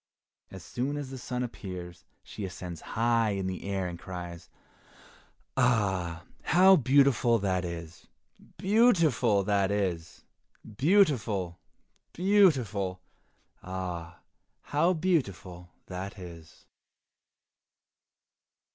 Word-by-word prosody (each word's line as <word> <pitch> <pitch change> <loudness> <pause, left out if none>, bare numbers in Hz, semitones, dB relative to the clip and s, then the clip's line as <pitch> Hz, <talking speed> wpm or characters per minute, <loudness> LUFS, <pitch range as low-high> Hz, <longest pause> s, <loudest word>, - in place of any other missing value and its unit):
As 95 -3 -10
soon 135 +4 -3
as 140 -2 -6
the 130 - -7
sun 125 0 -3
appears, 90 -7 -8 0.2
she 105 - -8
ascends 90 -3 -7
high 115 -2 +1
in 95 - -3
the 95 -1 -4
air 95 -1 -2
and 85 -1 -7
cries, 90 -2 -8 1.1
"Ah, 95 -9 +1 0.2
how 190 +3 +6
beautiful 135 - +4
that 95 -3 -1
is! 85 -1 -7 0.5
beautiful 170 - +3
that 100 -1 +1
is! 90 -5 -3 0.5
beautiful, 120 - +2 0.5
beautiful! 130 - +2 0.6
ah, 90 -2 -6 0.4
how 160 +5 +2
beautiful 105 - -2 0.2
that 95 +3 -6
is!" 85 -3 -12
100 Hz, 95 wpm, -29 LUFS, 90-135 Hz, 1.1 s, how